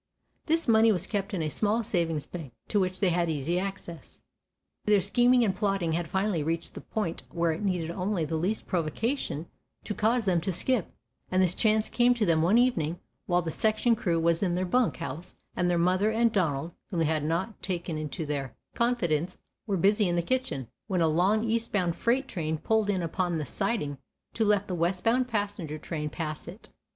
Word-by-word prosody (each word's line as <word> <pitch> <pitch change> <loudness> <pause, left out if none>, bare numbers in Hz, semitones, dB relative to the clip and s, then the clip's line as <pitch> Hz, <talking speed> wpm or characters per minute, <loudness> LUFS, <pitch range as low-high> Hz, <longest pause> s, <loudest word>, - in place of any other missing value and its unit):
This 330 +1 +2
money 225 0 +6
was 185 -3 0
kept 200 -1 -2
in 180 -5 -1
a 155 - -1
small 215 +6 +1
savings 165 -7 -1
bank, 155 -9 -8 0.2
to 210 - +2
which 185 -1 -1
they 195 - +3
had 170 0 +1
easy 160 +3 0
access. 190 -4 -6 0.7
Their 210 -1 +5
scheming 245 +6 +4
and 190 -3 0
plotting 195 -5 0
had 170 0 -1
finally 190 -1 0
reached 165 +2 -2
the - - -8
point 190 -7 -3
where 170 -1 +1
it 160 - -4
needed 180 -5 -1
only 185 -1 -1
the 160 - -3
least 185 +7 -1
provocation 175 - -2 0.4
to - - -3
cause 225 +2 +1
them 180 -3 +2
to 190 - -1
skip, 220 +3 0 0.4
and 185 - +1
this 185 -2 +3
chance 215 0 +2
came 245 +1 +3
to 230 -3 +1
them 165 -3 +3
one 185 +8 +4
evening 175 -10 +2 0.3
while 175 0 +2
the 165 - -3
section 220 +5 +2
crew 170 -6 0
was 165 0 +2
in 180 -3 +1
their 185 +1 0
bunk 245 +6 +1
house, 165 +1 -6 0.2
and 180 0 +1
their 175 - +2
mother 185 +4 +3
and 230 +1 +2
Donald, 165 -4 0 0.2
whom 175 - -2
they - - +3
had 155 -1 0
not 170 +8 -2
taken 175 -3 -3
into 155 0 -4
their 140 -4 -3 0.2
confidence, 180 -9 0 0.3
were 200 -2 0
busy 200 +2 +3
in 175 - 0
the 170 - +1
kitchen, 255 - -1 0.2
when 185 -4 0
a 165 - +4
long, 185 +8 +2
eastbound 220 -6 0
freight 260 +3 +1
train 160 -8 -2
pulled 220 +5 +1
in 190 -3 +1
upon 175 +1 -1
the 155 - -3
siding 170 - -2 0.3
to 225 - 0
let 205 -2 +3
the 185 - -3
westbound 185 +9 +1
passenger 205 -9 -3
train 150 -1 -4
pass 155 -1 -5
it. 185 +6 -10
185 Hz, 200 wpm, -28 LUFS, 165-215 Hz, 0.7 s, money